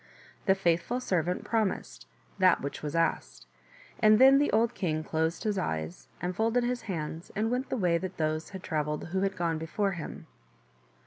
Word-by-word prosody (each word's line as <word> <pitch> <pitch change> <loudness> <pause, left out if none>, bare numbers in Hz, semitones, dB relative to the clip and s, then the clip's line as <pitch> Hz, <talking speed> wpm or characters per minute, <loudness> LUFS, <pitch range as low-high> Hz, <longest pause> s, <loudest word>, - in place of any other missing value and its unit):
The 190 - +5
faithful 185 +6 +1
servant 180 -6 -1
promised 190 - -2 0.3
that - - +5
which 140 - -5
was 150 +1 -4
asked, - - -1 0.5
and 215 0 +6
then 270 +3 +7
the 290 - +2
old 230 +2 +2
king 155 -7 -1
closed 160 +1 -1
his 210 -3 0
eyes 80 +1 -4
and 180 +1 -3
folded 225 +4 +2
his 245 0 -1
hands 160 -1 -4
and 220 +2 0
went 255 +2 -1
the - - -1
way 175 -5 +2
that 185 +1 -6
those 155 0 -1
had 190 -2 -8
travelled 150 -1 -2
who 190 +2 -1
had 195 0 0
gone 165 -2 0
before 195 +5 -1
him. 170 -5 -7
180 Hz, 180 wpm, -29 LUFS, 155-215 Hz, 0.5 s, then